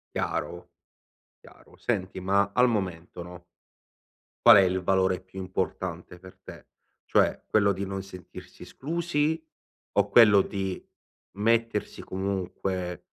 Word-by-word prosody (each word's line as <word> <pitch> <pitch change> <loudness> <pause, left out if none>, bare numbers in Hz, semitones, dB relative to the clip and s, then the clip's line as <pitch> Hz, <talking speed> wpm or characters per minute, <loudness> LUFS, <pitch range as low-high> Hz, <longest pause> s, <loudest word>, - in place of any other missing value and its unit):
Chiaro. - - -3 0.7
Chiaro. - - -19
Senti, 95 -5 -2
ma 100 +1 +1
al 125 +2 +4
momento, 90 -5 -4
no 90 0 -11 1.0
qual 115 -2 +10
è 100 - +7
il 95 0 +1
valore 95 0 +1
più 95 +1 -11
importante 90 -2 -4
per 90 +1 -15
te? - - -12 0.4
Cioè, - - +2
quello 100 -2 +2
di 100 +1 -4
non 95 0 -4
sentirsi 90 -2 -12
esclusi 160 - -2 0.6
o - - +3
quello 105 -4 +7
di 95 -2 -4 0.5
mettersi 115 0 0
comunque 95 -1 -4
95 Hz, 120 wpm, -27 LUFS, 90-105 Hz, 1.0 s, qual